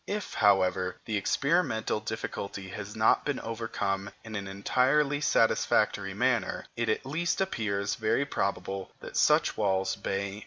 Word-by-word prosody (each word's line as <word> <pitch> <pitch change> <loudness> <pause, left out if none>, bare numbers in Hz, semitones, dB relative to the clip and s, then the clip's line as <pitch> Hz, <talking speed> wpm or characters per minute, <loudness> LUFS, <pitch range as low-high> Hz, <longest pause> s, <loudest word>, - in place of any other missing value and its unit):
If, 210 0 -3
however, 95 -2 +3
the 110 - -2
experimental 110 - +1
difficulty 105 -3 -5
has 105 +1 -7
not 110 0 +4
been 145 -3 -2
overcome 100 -4 -3
in 110 -1 -8
an 100 -1 -4
entirely 135 +9 +2
satisfactory 100 -6 +2
manner, 120 -2 0
it 120 -1 -1
at 110 - 0
least 160 +6 -1
appears 105 - -1
very 115 +5 +1
probable 95 -5 -2
that - - -9
such - - +4
walls 95 -2 +1
may - - -20
nevertheless 100 +1 -1
exist. 100 - -8
110 Hz, 150 wpm, -29 LUFS, 100-125 Hz, -, not